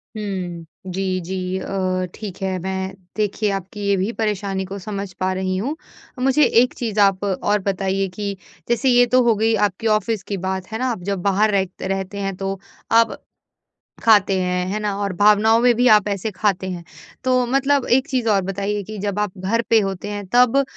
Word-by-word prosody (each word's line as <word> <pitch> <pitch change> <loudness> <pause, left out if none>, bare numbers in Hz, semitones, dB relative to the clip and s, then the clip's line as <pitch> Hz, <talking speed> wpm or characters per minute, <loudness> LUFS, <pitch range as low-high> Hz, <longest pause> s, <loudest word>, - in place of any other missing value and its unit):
हुँ, 185 -5 -4 0.3
जी, 185 0 -1
जी 185 +1 -3
अ, 185 -1 -1
ठीक 200 -4 -8
है। 190 -1 -1
मैं 190 +1 -3 0.2
देखिए 210 0 0
आपकी 195 +1 -5
ये 200 - +3
भी 190 +4 -1
परेशानी 200 -3 -1
को 195 +2 -6
समझ 200 0 -5
पा 185 0 0
रही 185 0 -1
हूँ। 260 +11 -2 0.4
मुझे 270 +4 +3 0.2
एक 250 - +1
चीज़ 220 -4 -2
आप 195 -1 +4
और 205 +2 0
बताइए 195 0 0
कि 200 -1 -3 0.3
जैसे 240 +3 +2
ये 245 0 +6
तो 255 +1 +3
हो 235 -2 +4
गई 220 +2 +2
आपकी 205 +4 -5
ऑफ़िस 215 -1 -3
की 200 - -4
बात, 190 -1 -3
है 220 - -3
ना? 255 - 0
आप 215 -7 -5
जब 195 -2 -2
बाहर 200 +3 +2
रह 190 -1 +2 0.2
रहते 195 +1 -3
हैं 195 -1 -2
तो 195 0 -4 0.3
आप 230 0 +4 0.9
खाते 205 -3 +5
हैं, 180 0 0
है 205 +3 -2
ना? 210 -2 -2
और 200 -2 -1
भावनाओं 210 +2 +5
में 245 0 +5
भी 245 +2 +3
आप 210 -3 +6
ऐसे 200 +2 -2
खाते 195 -2 0
हैं। 175 -2 -5 0.4
तो 255 -1 +2
मतलब 275 +1 +2
एक 265 +2 -2
चीज़ 255 -6 -1
और 200 -2 +3
बताइए 200 +2 -2
कि 215 +3 -8
जब 205 0 -2
आप 205 -2 -2
घर 200 +5 0
पे 225 - +6
होते 195 0 -4
हैं 205 -1 -5
तब 250 +1 +5
अ, 275 - +4
200 Hz, 200 wpm, -21 LUFS, 190-220 Hz, 0.9 s, ये